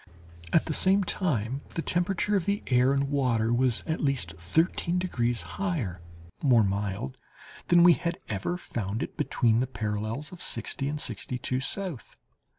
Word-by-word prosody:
At 160 - +4
the 160 - -2
same 195 +5 +4
time 135 - -1
the 165 - -1
temperature 180 +3 0
of 190 -2 0
the 200 0 0
air 125 +1 +3
and 140 0 +1
water 120 -5 +1
was 125 -1 +1
at 160 0 -2
least 135 - 0
thirteen 165 - +1
degrees 120 -10 -1 0.2
higher 125 - -2 0.4
(more 125 -6 +5
mild) 100 -8 -2 0.5
than 175 -1 +6
we 175 0 +8
had 170 +1 -2
ever 110 - -2
found 110 - -3
it - - -7
between 120 -7 +2
the 130 - 0
parallels 110 +4 -3
of 180 - -11
sixty 120 +4 -2
and 150 +1 -2
sixty 125 0 -2
two 125 +1 -1
south. 165 - -2
135 Hz, 160 wpm, -28 LUFS, 110-170 Hz, 0.5 s, we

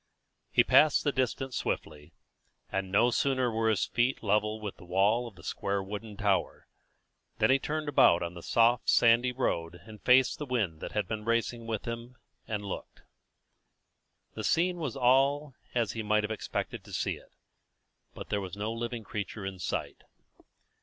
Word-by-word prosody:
He - - +4
passed 155 -1 +5
the 145 - +2
distance 130 -1 -2
swiftly, 75 +1 -4 0.6
and 95 -1 -2
no 115 +5 +4
sooner 130 -1 +1
were 110 0 +1
his 110 - +2
feet 120 +1 0
level 105 +1 +1
with 105 -2 -6
the - - -14
wall 100 +7 +2
of 110 - -12
the 80 - -15
square 100 0 -2
wooden 105 +1 -7
tower, 100 -4 0 0.7
than - - +3
he 135 - +4
turned 155 +2 -3
about 85 -12 +5
on 85 0 -4
the 85 - -9
soft 115 +5 +3
sandy 120 +2 +5
road 90 -9 -2
and 110 -1 -12
faced 125 0 +4
the 150 - -5
wind 105 -11 -1
that - - -6
had 105 -3 -1
been 110 +1 -4
racing 115 +1 -1
with 110 -2 -3
him, 115 +2 -6 0.3
and 105 -2 -3
looked. 100 - -7 1.3
The - - -5
scene 175 +2 +2
was 150 -8 -3
all 135 +3 +3 0.2
as 115 -4 +1
he 115 - -4
might 105 0 +2
have 105 - -3
expected 110 - -4
to - - -12
see - - -1
it; - - -20 0.8
but - - -8
there 105 - 0
was 95 0 -7
no 105 +2 -2
living 115 0 -4
creature 100 0 -5
in 95 -1 -5
sight. - - -3
110 Hz, 175 wpm, -30 LUFS, 100-125 Hz, 1.3 s, passed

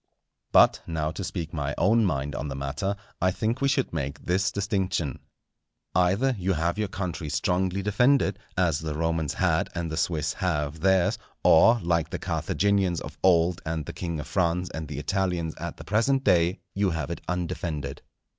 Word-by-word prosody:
But - - +6
now 80 -2 -1
to 95 - -5
speak 85 -3 -4
my 75 -2 -2
own 110 +5 +4
mind 70 -5 -1
on 70 +3 -3
the 70 - -4
matter, 70 +9 -2 0.3
I 90 - +4
think 110 +7 -1
we 140 - +3
should 135 -6 0
make 70 -2 -4
this 95 +3 +1
distinction. 95 -7 -1 0.7
Either 100 +9 +2
you 95 +1 +1
have 85 +4 -1
your 105 - 0
country 90 -4 -4
strongly 90 +5 0
defended, 105 0 +3 0.2
as 85 -5 +2
the 80 -1 -4
Romans 80 -2 -1
had - - +1
and 85 -1 -3
the 80 - -3
Swiss 75 0 0
have 80 -5 -2
theirs, 95 +1 +3 0.2
or, 115 +9 +6
like 85 -2 +1
the - - -3
Carthaginians 95 -4 0
of - - -9
old 85 -1 +3
and 80 -2 -3
the - - -6
King 85 -3 -4
of 75 - -5
France 90 -1 0
and 80 -1 -5
the 70 -1 -6
Italians 90 -5 -1
at 85 +1 -5
the - - -9
present 130 +6 +1
day, 90 -4 +3
you 100 0 +1
have 80 -5 -3
it - - -5
undefended. 80 -5 -3
85 Hz, 180 wpm, -26 LUFS, 80-95 Hz, 0.7 s, But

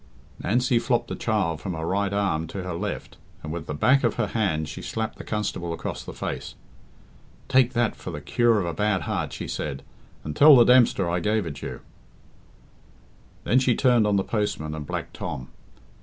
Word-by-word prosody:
Nancy 120 +3 +2
flopped 120 -1 0
the - - -3
child 95 -8 -1
from 95 -4 -4
her 80 0 -4
right 100 +2 0
arm 95 -6 0
to 95 +3 -6
her 90 -1 -4
left, 100 +5 -5 0.3
and 75 - -5
with 85 -2 -6
the 75 - -3
back 130 - +4
of 120 - +1
her 120 - 0
hand 95 -8 -1
she - - -7
slapped 110 -1 -4
the - - -6
constable 95 -5 -3
across - - -5
the - - -8
face. - - -5 0.9
"Take 130 -1 +4
that 120 -2 +1
for - - -8
the 75 - -5
cure 115 - +2
of 95 - -1
a 85 - -2
bad 105 +2 +1
heart," - - -2
she - - -6
said, 70 -3 -4 0.4
"and 75 -1 -5
tell 150 0 +9
the 120 - +8
Dempster 120 -7 +5
I 85 +1 0
gave 105 +3 0
it 75 -3 -6
you." - - -6 1.6
Then 125 - +3
she 130 -2 +2
turned 120 -5 +4
on 105 - +2
the 95 - +2
postman 105 -9 -2
and 75 -2 -6
Black - - -4
Tom. 65 0 -6
100 Hz, 200 wpm, -25 LUFS, 85-115 Hz, 1.6 s, tell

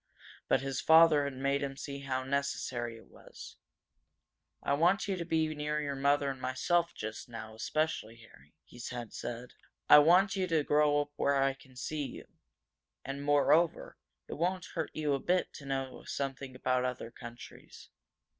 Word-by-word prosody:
But - - +3
his 135 -1 -3
father 160 -2 +6
had 140 -1 -4
made 140 +1 0
him 135 -1 -4
see 140 0 -6
how 130 -2 -2
necessary 130 -4 -2
it 110 - -16
was. - - -13 1.1
"I 140 - +1
want 175 +8 +3
you 195 - 0
to 170 -2 -4
be 160 -2 0
near 150 0 -2
your 145 -2 -3
mother 140 +1 +2
and 130 -1 -9
myself 170 +7 0
just 110 +2 -6
now, 115 -1 -8
especially, 115 -1 -2
Harry," 115 -1 -19
he 120 - -13
had 120 -3 -6
said. 120 +1 -6 0.3
"I - - +10
want 180 +7 +5
you 190 -1 0
to 160 -3 +2
grow 145 0 +3
up 145 0 -6
where 140 - +2
I 135 0 +2
can 135 -1 -19
see 150 +4 -3
you. - - -10 0.8
And, 140 +1 -5
more 145 0 +4
over, 165 +1 +1 0.3
it - - -7
won't 180 +1 0
hurt 160 -2 -2
you 150 -2 0
a 135 - 0
bit 180 +6 0
to 140 - -10
know 135 -1 -3
something 135 -1 -4
about 130 0 0
other 125 -2 -4
countries. 120 0 -12
140 Hz, 175 wpm, -31 LUFS, 130-155 Hz, 1.1 s, I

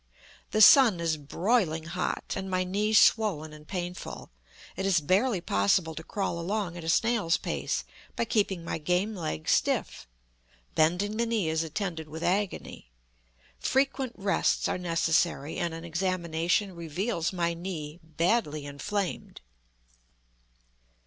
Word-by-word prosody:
The 215 - +5
sun 220 -4 +8
is 165 -1 0
broiling 165 - 0
hot, 180 +2 -3
and 190 0 -4
my 185 0 +1
knee 205 +4 -1
swollen 205 -8 +4
and 150 0 -13
painful. 180 -1 -6 0.4
It 190 - -3
is 190 -3 +4
barely 190 - +1
possible 160 - +1
to 160 - -7
crawl 190 -2 -3
along 185 0 -2
at 175 - -7
a 160 - -3
snail's 205 -3 +2
pace - - -2 0.3
by 235 - 0
keeping 200 -6 0
my 165 - -3
game 180 +7 0
leg 155 - -4
stiff; - - 0 0.7
bending 180 +7 +1
the 235 0 +1
knee 220 -8 0
is 160 0 0
attended 165 -1 -4
with 160 +2 -7
agony. 190 - -2 0.7
Frequent 265 -2 0
rests 195 -1 +1
are - - -2
necessary, 165 -3 0
and 170 -1 -1
an 165 +1 -7
examination 175 +2 0
reveals 170 +2 -2
my 170 -2 0
knee 165 -3 -6
badly 160 -1 0
inflamed. 185 +7 -4
175 Hz, 135 wpm, -28 LUFS, 160-205 Hz, 0.7 s, sun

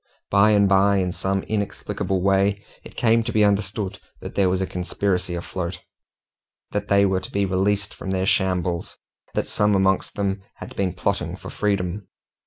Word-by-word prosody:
By 100 +1 +5
and 100 -1 +5
by, 100 +1 +4
in 90 -1 0
some 95 +1 -1
inexplicable 100 -3 -2
way, 100 +1 +2 0.2
it - - -13
came 115 -1 +3
to 120 - -3
be 110 -2 +3
understood 100 0 0 0.2
that - - -7
there 95 -2 +3
was 90 0 +1
a 95 - 0
conspiracy 90 0 -1
afloat, 85 +1 -4 0.9
that 105 0 -2
they 100 0 +4
were 95 -1 +1
to 95 - -9
be 100 0 +1
released 100 +2 0
from - - -7
their 95 0 0
shambles, 90 -4 0 0.4
that - - 0
some 105 0 +2
amongst 95 0 +1
them 100 -1 -1
had - - -10
been 95 -3 0
plotting - - -1
for - - -9
freedom. 100 -1 -1
95 Hz, 175 wpm, -23 LUFS, 95-100 Hz, 0.9 s, By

